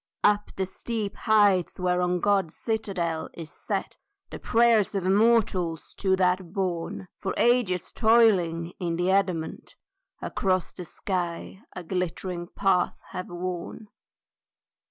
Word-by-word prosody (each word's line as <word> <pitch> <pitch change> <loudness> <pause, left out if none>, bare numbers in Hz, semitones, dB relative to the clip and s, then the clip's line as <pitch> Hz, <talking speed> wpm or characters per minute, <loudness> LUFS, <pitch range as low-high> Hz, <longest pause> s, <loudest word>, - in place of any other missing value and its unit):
UP 205 0 +3
the 190 - -1
steep 210 +2 -4
heights 205 -6 +3
whereon 180 0 +1
God's 195 -4 +1
citadel 190 -8 -2
Is 165 -2 -8
set, - - -4 0.3
the - - -7
prayers 230 -3 +3
of 195 - 0
mortals 190 -4 +2
to 190 -2 +2
that 180 -1 0
bourne, 185 -1 -3
For 190 - -3
ages 235 -7 +2
toiling, 185 -8 +3
in 170 -2 -1
the 175 +2 +1
adamant, 185 -5 -1 0.4
Across 185 -2 -1
the 180 - -8
sky 180 +1 -4
a 180 - -6
glittering 180 0 -3
path 185 -1 +1
have 185 - -5
worn. 180 +4 -5
185 Hz, 120 wpm, -26 LUFS, 175-205 Hz, 0.4 s, UP